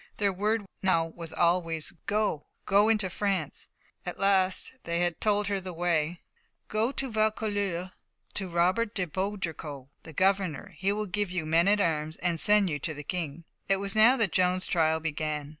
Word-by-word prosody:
Their 200 -2 +1
word 210 +3 0 0.2
now 175 -4 +3
was 165 0 -8
always, 170 -2 +1 0.2
"Go 210 -7 +1 0.2
go 205 +3 +4
into 215 -3 +2
France!" 185 -4 -2 0.4
At - - -5
last 195 +5 +2
they 170 +1 -1
had 175 -1 -1
told 210 -1 +2
her 200 0 0
the 185 -1 -7
way: 170 -1 0 0.5
"Go 220 +4 +1
to 270 -3 -2
Vaucouleurs, 205 -4 0 0.4
to 190 -2 -3
Robert 185 +6 +1
de 185 - 0
Baudricourt, 160 -7 -4
the 165 - -11
governor; 190 -3 +1
he 195 +1 +2
will 210 +1 -1
give 205 0 -1
you 175 -3 -2
men 165 +3 +3
at 205 +1 +4
arms, 155 -4 0
and 170 -2 0
send 210 +1 +4
you 150 -4 -2
to 155 +2 -3
the 145 - -7
King." 165 -1 -4 0.2
It 195 - +3
was 195 +1 0
now 230 +5 +6
that 220 -7 +2
Joan's 185 0 +2
trial 160 -2 +2
began. 155 -2 -3
185 Hz, 175 wpm, -28 LUFS, 165-205 Hz, 0.5 s, now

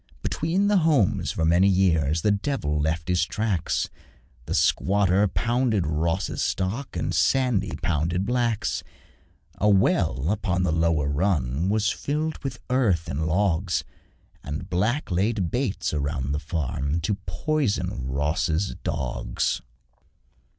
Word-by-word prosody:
Between 180 +6 0
the 205 -1 +4
homes 155 - +2
for 80 - -1
many 85 +4 +4
years 80 -5 +2
The 105 - +4
devil 100 - -1
left 80 +2 -1
his 90 -1 +2
tracks: 100 -2 -1 0.6
The - - -1
squatter 100 0 +3
pounded 115 -2 +1
Ross's 80 +2 -1
stock, 105 +9 -2
And - - -1
Sandy 120 -8 +1
pounded 85 +4 0
Black's. 120 -2 0 0.8
A 105 - +3
well 95 -5 +2
upon 95 -4 0
the 90 - +1
lower 80 -3 +1
run 75 -1 0
Was 110 +1 +2
filled 155 +2 -2
with 125 -4 -4
earth 105 -11 +2
and 80 +3 -2
logs, 90 0 +1 0.6
And 75 +2 -6
Black 105 +9 0
laid 95 0 0
baits 125 -9 -1
about 70 -2 -2
the 75 - 0
farm 75 -1 -2
To 90 +6 0
poison 100 - -1
Ross's 80 +6 0
dogs. - - -2
90 Hz, 125 wpm, -25 LUFS, 80-110 Hz, 0.8 s, the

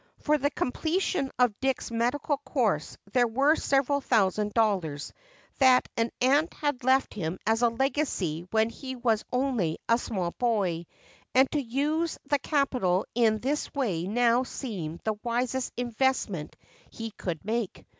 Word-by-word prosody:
For 300 0 +1
the 285 +1 +2
completion 315 +2 -1
of 245 -5 +2
Dick's 265 -2 -1
medical 250 +6 0
course 225 - -1 0.2
there 245 -1 +4
were 275 +7 +3
several 280 0 +1
thousand 210 -4 +2
dollars 185 -10 0 0.5
that 260 -2 +5
an 230 0 +1
aunt 285 +6 +3
had 290 -4 -2
left 260 +1 +3
him 175 -3 -3
as 225 +1 +2
a 240 - +5
legacy 230 - -1
when 220 +2 +2
he 260 +1 -7
was 230 -3 +1
only 250 -11 0
a 230 +1 +4
small 185 -8 -2
boy 190 -9 0 0.5
and 265 +1 +5
to 295 - 0
use 295 +7 -1
the 290 0 +2
capital 255 - +1
in 225 -2 +3
this 275 +7 -2
way 190 -11 -1
now 235 +3 +3
seemed 190 - -5
the 220 - 0
wisest 245 +2 -1
investment 240 - -1 0.3
he 225 -1 -6
could 175 -5 -5
make. 220 -2 -3
240 Hz, 145 wpm, -28 LUFS, 210-270 Hz, 0.5 s, that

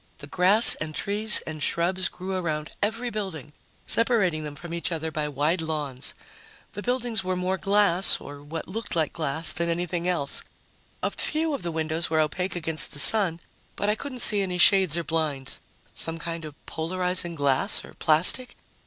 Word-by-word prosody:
The - - -10
grass 185 +9 +8
and 155 0 -5
trees 210 +2 0
and 155 -1 -7
shrubs 185 +4 +1
grew 185 +1 -6
around 155 -4 -3
every 230 +4 -1
building, 190 -9 -6 0.3
separating 200 -10 +1
them 150 -1 -7
from 170 +3 -9
each 170 +1 -3
other 160 -1 -3
by 155 -1 -2
wide 150 +5 0
lawns. 145 -5 -4 0.6
The 205 - -6
buildings 240 -3 -1
were 185 0 -2
more 185 +1 -2
glass 195 -2 +3
or 145 0 -10
what 155 +3 -7
looked 220 +2 -4
like 160 -2 0
glass 160 0 -1
than 170 +1 -1
anything 175 +1 -2
else. 165 -6 0 0.6
A - - 0
few 315 0 -1
of 275 - -3
the 175 - -3
windows 160 +1 -2
were 160 0 +1
opaque 180 +5 -1
against 160 -2 -2
the 145 - -3
sun, 180 -2 +4 0.3
but 205 - 0
I - - +2
couldn't 255 0 -6
see 205 -1 +5
any 180 -2 -2
shades 185 -3 +4
or 170 - -2
blinds. 150 -4 -2 0.3
Some 165 0 -5
kind 165 0 -6
of 150 -2 -9
polarizing 180 +1 -2
glass 140 -3 +1
or - - -14
plastic? 170 +11 +2
170 Hz, 180 wpm, -25 LUFS, 155-195 Hz, 0.6 s, grass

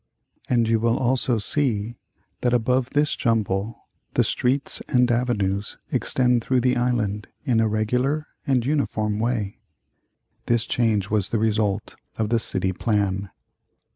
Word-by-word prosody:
And 120 -2 +2
you 115 0 +2
will 115 +1 +1
also 125 -1 +1
see 115 -1 -1 0.4
that 125 0 +2
above 125 +2 +1
this 145 0 +1
jumble 110 -2 -1 0.3
the - - +4
streets 135 +3 +1
and 125 -1 +3
avenues 105 -5 -1
extend 125 -2 +1
through 130 0 +1
the 125 +1 +2
island 115 -4 -1 0.2
in 120 -5 +2
a 110 - +3
regular 125 +8 0 0.2
and 130 -4 +2
uniform 110 -7 0
way. 110 -4 -2 0.9
This 120 -1 +1
change 105 -5 0
was 105 -3 +1
the 115 - 0
result 105 -2 0 0.2
of 110 -2 -1
the 115 0 +2
City 95 -3 0
Plan. 100 -2 -1
115 Hz, 140 wpm, -23 LUFS, 105-125 Hz, 0.9 s, the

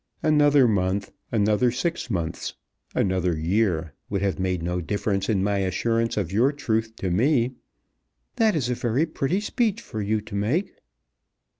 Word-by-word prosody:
"Another 145 -3 +5
month, 100 -1 0 0.2
another 110 +2 +3
six 150 +5 -2
months, 85 -5 -3 0.4
another 90 -3 +1
year, 85 -2 0 0.2
would 100 -1 -1
have 100 -1 0
made 90 -2 -1
no 90 +1 -1
difference 100 +1 -1
in 100 -4 +2
my 100 0 +1
assurance 115 +5 0
of 95 -5 -1
your 120 +8 +3
truth 115 -6 -2
to 95 -5 -3
me." 125 - +2 0.8
"That 220 -3 +3
is 135 -6 0
a - - +2
very 120 +5 +1
pretty 165 +4 -1
speech 225 -1 0
for 110 - -6
you 105 +2 0
to 110 0 -12
make." 120 - 0
110 Hz, 155 wpm, -25 LUFS, 95-130 Hz, 0.8 s, Another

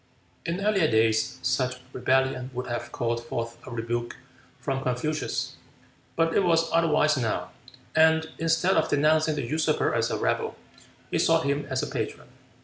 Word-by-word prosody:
In 180 +4 -2
earlier 195 -6 +3
days 110 +2 +2
such 130 0 0 0.2
rebellion 130 0 +1
would 125 +1 -3
have 120 -1 -4
called 120 0 -2
forth 115 0 -4
a - - -6
rebuke 120 0 -3 0.4
from 135 +1 -2
Confucius; 135 +5 -2 0.6
but 165 0 +2
it - - +4
was 165 -2 +2
otherwise 155 -2 +3
now, 115 -4 -2 0.4
and, 160 0 +4
instead 165 +3 +2
of 160 - +2
denouncing 155 +1 +3
the 145 -4 -2
usurper 155 +5 +1
as - - +1
a - - -1
rebel, - - -1 0.6
he - - +1
sought 165 0 +3
him 140 +1 -1
as 130 -1 -1
a - - -2
patron. - - -4
140 Hz, 155 wpm, -26 LUFS, 120-160 Hz, 0.6 s, it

